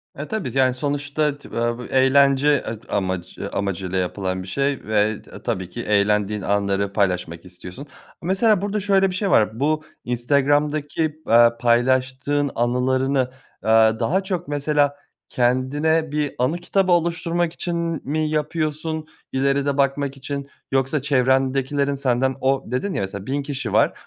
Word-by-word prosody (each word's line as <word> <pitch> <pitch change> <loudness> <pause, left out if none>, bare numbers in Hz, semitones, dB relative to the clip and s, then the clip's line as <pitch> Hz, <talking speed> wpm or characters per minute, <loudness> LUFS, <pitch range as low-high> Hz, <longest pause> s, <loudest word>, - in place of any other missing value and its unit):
E, 145 +2 -6
tabii. 145 - -3
Yani, 130 -1 +4
sonuçta 145 +2 -1
tı - - -15
vav 120 0 -1
bu 125 - -7
eğlence 135 +1 +4 0.2
ed 110 0 -6
amac 95 -2 -3
eee, - - -3
amacıyla 95 -1 -2
yapılan 95 0 -2
bir - - -11
şey 140 +5 -1
ve 105 0 +1
t - - -13
tabii 95 -7 -3
ki 120 +6 -6
eğlendiğin 105 0 +1
anları 100 0 0
paylaşmak 90 -4 -1
istiyorsun. 90 +9 -10 0.3
Mesela 195 +3 +2
burada 205 +1 -1
şöyle 195 -1 +3
bir 180 - -5
şey 195 +1 -1
var, 110 +2 +2
bu 155 +2 +1 0.2
Instagram'daki, 145 +5 0
aaa, 115 0 +5
paylaştığın 130 +4 +1
anılarını, 130 +2 +1 0.3
aaa, 110 0 +4
daha 190 +4 +1
çok 180 -4 -3
mesela 145 0 0 0.3
kendine 145 +6 +1
bir 150 -2 -1
anı 130 +7 +1
kitabı 185 +1 0
oluşturmak 170 0 +1
için 175 -1 -3
m 165 -2 -2
mi 155 0 0
yapıyorsun, 155 0 -2 0.2
ileride 140 +1 +1
bakmak 140 0 0
için? 140 +1 -5 0.2
Yoksa 135 +2 +1
çevrendekilerin 135 +1 +1
senden 130 -1 0
O, 135 0 +1
dedin 175 +10 -1
ya, - - -1
mesela, 95 0 -5
"1.000 140 +3 -2
kişi 135 -6 -4
var, - - +4
135 Hz, 150 wpm, -22 LUFS, 115-150 Hz, 0.3 s, aaa